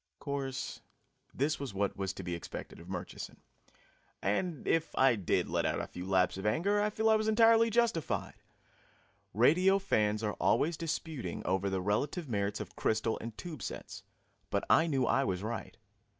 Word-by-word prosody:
Of -, -, -56 dB
course, 135 Hz, -2 st, -3 dB, 0.5 s
this 145 Hz, +4 st, 0 dB
was 135 Hz, -8 st, -5 dB
what 100 Hz, 0 st, 0 dB
was 95 Hz, -1 st, -2 dB
to 95 Hz, -, -7 dB
be 90 Hz, 0 st, -3 dB
expected 85 Hz, -, -7 dB
of 85 Hz, +2 st, -12 dB
Murchison. 90 Hz, -1 st, -6 dB, 0.8 s
And 150 Hz, -, -1 dB
if 165 Hz, 0 st, +1 dB
I 130 Hz, -2 st, +5 dB
did 100 Hz, -5 st, 0 dB
let -, -, 0 dB
out -, -, 0 dB
a -, -, -2 dB
few 90 Hz, +1 st, -8 dB
laps 95 Hz, -1 st, +2 dB
of 95 Hz, -, -6 dB
anger, 200 Hz, -, +2 dB
I 210 Hz, -, +2 dB
feel 220 Hz, +1 st, 0 dB
I 220 Hz, -, +6 dB
was 215 Hz, 0 st, 0 dB
entirely 225 Hz, +1 st, +5 dB
justified. 220 Hz, -, 0 dB, 1.0 s
Radio 180 Hz, -, +5 dB
fans 110 Hz, -, +1 dB
are 105 Hz, -1 st, 0 dB
always 165 Hz, +3 st, +3 dB
disputing 155 Hz, -, -4 dB
over 95 Hz, +1 st, +1 dB
the 95 Hz, -1 st, -1 dB
relative 145 Hz, -, -1 dB
merits 100 Hz, -3 st, -1 dB
of -, -, -7 dB
crystal 110 Hz, 0 st, 0 dB
and 115 Hz, -1 st, -7 dB
tube 160 Hz, -8 st, -7 dB
sets, -, -, -6 dB, 0.5 s
but -, -, 0 dB
I 160 Hz, -, +5 dB
knew 135 Hz, -5 st, +1 dB
I 135 Hz, -, +3 dB
was 95 Hz, -6 st, -2 dB
right. 115 Hz, +2 st, -5 dB
130 Hz, 180 wpm, -32 LUFS, -, 1.0 s, I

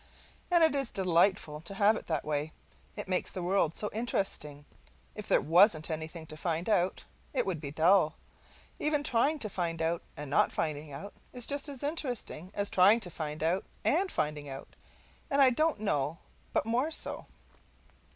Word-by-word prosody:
And 345 Hz, -2 st, +5 dB
it 320 Hz, -, +5 dB
is 275 Hz, -4 st, 0 dB
delightful 175 Hz, -4 st, +2 dB
to 185 Hz, +4 st, -8 dB
have 205 Hz, +2 st, +4 dB
it -, -, -7 dB
that 160 Hz, -3 st, -1 dB
way, 150 Hz, +1 st, -2 dB, 0.4 s
it -, -, -6 dB
makes 185 Hz, -1 st, +1 dB
the 185 Hz, -, -5 dB
world 175 Hz, -3 st, +1 dB
so 210 Hz, -, -2 dB
interesting. 190 Hz, -10 st, -3 dB, 0.5 s
If -, -, -8 dB
there -, -, +4 dB
wasn't 170 Hz, -1 st, +4 dB
anything 160 Hz, +1 st, -5 dB
to 155 Hz, -, -8 dB
find 165 Hz, +2 st, -2 dB
out, 190 Hz, -4 st, +1 dB, 0.3 s
it -, -, +1 dB
would 175 Hz, -6 st, -2 dB
be 145 Hz, -, -5 dB
dull. 160 Hz, +2 st, +3 dB, 0.6 s
Even 295 Hz, -1 st, +1 dB
trying 280 Hz, +5 st, +2 dB
to 235 Hz, -, 0 dB
find 170 Hz, -4 st, -3 dB
out 165 Hz, +1 st, 0 dB, 0.2 s
and 150 Hz, -, -6 dB
not 135 Hz, -, +3 dB
finding 150 Hz, -1 st, -3 dB
out 150 Hz, +9 st, -8 dB, 0.2 s
is 245 Hz, -2 st, -3 dB
just 285 Hz, +1 st, -1 dB
as 275 Hz, -2 st, -8 dB
interesting 255 Hz, -, -3 dB
as 200 Hz, 0 st, 0 dB
trying 195 Hz, +5 st, +6 dB
to 180 Hz, -4 st, -5 dB
find 155 Hz, -1 st, -5 dB
out 175 Hz, +4 st, +1 dB, 0.2 s
and 370 Hz, +5 st, +2 dB
finding 150 Hz, -1 st, -2 dB
out, 135 Hz, 0 st, -9 dB, 0.5 s
and 280 Hz, -2 st, +1 dB
I 265 Hz, -2 st, +7 dB
don't 310 Hz, 0 st, +1 dB
know 150 Hz, -7 st, -1 dB, 0.3 s
but -, -, +1 dB
more 245 Hz, +7 st, +1 dB
so. 320 Hz, -, -3 dB
185 Hz, 180 wpm, -30 LUFS, 155-235 Hz, 0.6 s, I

